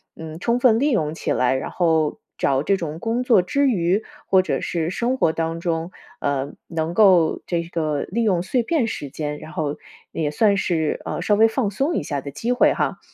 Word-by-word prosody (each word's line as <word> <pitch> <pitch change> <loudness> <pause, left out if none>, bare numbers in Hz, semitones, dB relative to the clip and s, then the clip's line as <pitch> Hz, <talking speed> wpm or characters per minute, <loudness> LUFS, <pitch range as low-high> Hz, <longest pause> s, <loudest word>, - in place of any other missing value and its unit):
嗯， 160 0 -8
充 235 +5 +1
分 235 -3 +5
利 290 +1 +2
用 155 -9 0
起 - - -3
来， 125 +1 +2
然 - - -4
后 160 -4 +1 0.2
找 135 +1 +1
这 195 +2 +2
种 160 -2 -5
工 230 +4 -1
作 230 -7 +5
之 280 +8 +1
余， 190 -1 +1 0.2
或 190 -1 +5
者 185 - -2
是 165 -1 -2
生 245 +6 -1
活 160 - +3
当 165 0 -2
中， 165 0 -2 0.3
呃， 140 0 -1
能 165 0 -2
够 185 -6 +4
这 170 -1 -1
个 155 -4 -2
利 230 +5 -2
用 185 -5 +2
碎 245 +4 0
片 280 -4 +1
时 145 -9 -5
间， 150 +1 -4
然 155 - -10
后 150 -1 -3 0.3
也 150 -2 -2
算 205 +4 +3
是， 165 -5 -1
呃， - - -3
稍 205 - +2
微 220 +2 +6
放 225 -3 0
松 280 - -1
一 - - 0
下 145 -3 -3
的 140 - -7
机 230 - -3
会 245 - +4
哈。 - - -2
170 Hz, 230 characters per minute, -22 LUFS, 155-225 Hz, 0.3 s, 微